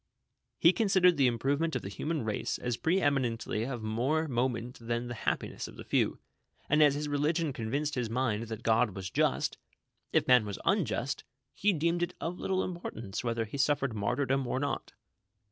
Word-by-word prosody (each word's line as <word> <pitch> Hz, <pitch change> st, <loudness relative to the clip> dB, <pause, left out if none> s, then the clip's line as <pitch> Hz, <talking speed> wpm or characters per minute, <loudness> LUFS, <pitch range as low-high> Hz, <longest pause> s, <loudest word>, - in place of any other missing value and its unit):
He 170 Hz, -, +6 dB
considered 190 Hz, -5 st, +4 dB
the 135 Hz, -2 st, +5 dB
improvement 140 Hz, +7 st, 0 dB
of -, -, -2 dB
the -, -, -5 dB
human 145 Hz, +7 st, -3 dB
race 105 Hz, -1 st, -1 dB
as 125 Hz, -1 st, -2 dB
pre 170 Hz, +9 st, +1 dB
eminently 125 Hz, -, 0 dB
of 125 Hz, -4 st, -4 dB
more 130 Hz, +9 st, 0 dB
moment 125 Hz, -2 st, -1 dB
than 120 Hz, +1 st, -2 dB
the 120 Hz, -, -5 dB
happiness 115 Hz, -, -2 dB
of -, -, -12 dB
the -, -, -9 dB
few; -, -, +1 dB, 0.5 s
and 150 Hz, +2 st, +4 dB
as 145 Hz, -2 st, +6 dB
his 150 Hz, +1 st, -2 dB
religion 150 Hz, +1 st, 0 dB
convinced 140 Hz, +6 st, -2 dB
his 120 Hz, -3 st, -1 dB
mind 115 Hz, -2 st, 0 dB
that 110 Hz, 0 st, -6 dB
God 110 Hz, -3 st, +2 dB
was 95 Hz, -1 st, -5 dB
just, -, -, +1 dB, 0.5 s
if -, -, +2 dB
man 125 Hz, -2 st, +6 dB
was 100 Hz, -2 st, -5 dB
unjnst, 140 Hz, -, 0 dB, 0.3 s
he 210 Hz, -, +2 dB
deemed 170 Hz, 0 st, 0 dB
it 175 Hz, -, -1 dB
of 175 Hz, +2 st, -4 dB
little 190 Hz, 0 st, 0 dB
importance 120 Hz, -, -5 dB
whether 115 Hz, -1 st, -1 dB
he 125 Hz, +6 st, -7 dB
suffered 140 Hz, -3 st, +2 dB
martyrdom 130 Hz, +5 st, 0 dB
or 130 Hz, -, -1 dB
not. 145 Hz, +1 st, -3 dB
130 Hz, 180 wpm, -31 LUFS, 115-155 Hz, 0.5 s, He